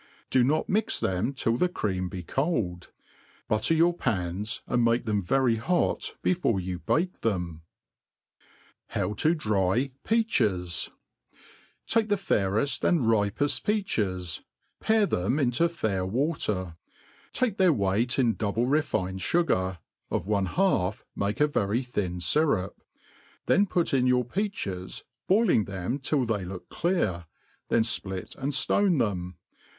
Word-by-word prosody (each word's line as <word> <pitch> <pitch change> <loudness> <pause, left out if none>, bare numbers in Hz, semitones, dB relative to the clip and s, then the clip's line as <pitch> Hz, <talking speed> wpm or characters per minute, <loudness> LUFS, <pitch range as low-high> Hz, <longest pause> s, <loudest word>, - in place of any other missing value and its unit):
Do 130 - +4
not 155 +5 +1
mix 215 +2 +1
them 95 +7 0
till 120 -4 0
the 180 - +2
cream 95 - -2
be 90 -2 -6
cold; 110 - -2 0.6
butte^ 110 +10 +2
your 170 +1 +4
pans^ 100 - -2
and 120 -1 +1
make 115 +1 +2
them 105 -2 0
very 120 +4 +2
hot 175 +11 0
before 170 - +1
you 90 -1 -4
bake 180 - -1
them. 90 -7 -2 1.3
How 105 - -2
to 155 - +2
dry 110 - +1
Peachei^ 105 - 0 0.5
/ - - -27
TAKE 225 -1 +1
the 205 - +3
falreft 115 - 0
and 170 -4 +3
ripeft 115 +4 +1
peaches, 100 - -1 0.4
pare 220 -1 +3
them 100 - 0
'into 140 +4 +2
fair; 110 - -1
water; 100 - -1 0.5
take 235 -6 0
their 185 -2 +5
weight 105 0 +1
in 120 -4 +3
double 110 +3 -1
refined 110 -10 0
fugar, 95 - +1 0.3
of - - -2
one 100 -2 +1
half 110 - 0
make 100 +1 -2
a 150 - +5
vf 105 -9 -1
ry 115 +5 +1
thin 100 -8 -3
fyrup; 95 - +1 0.7
then 200 +2 +3
put 175 -5 0
in 130 -2 +3
your 125 -1 +3
peaches, 120 - -4 0.2
boiling 190 - +3
themi 100 +8 -3
till 140 -2 +1
they 110 -4 -1
look 90 0 -8
clear, 105 - -1 0.4
then 115 - +3
fplit 95 -4 -2
and 140 +2 -2
ftone 185 +4 +2
them. 90 -7 -1
115 Hz, 140 wpm, -27 LUFS, 95-155 Hz, 1.3 s, their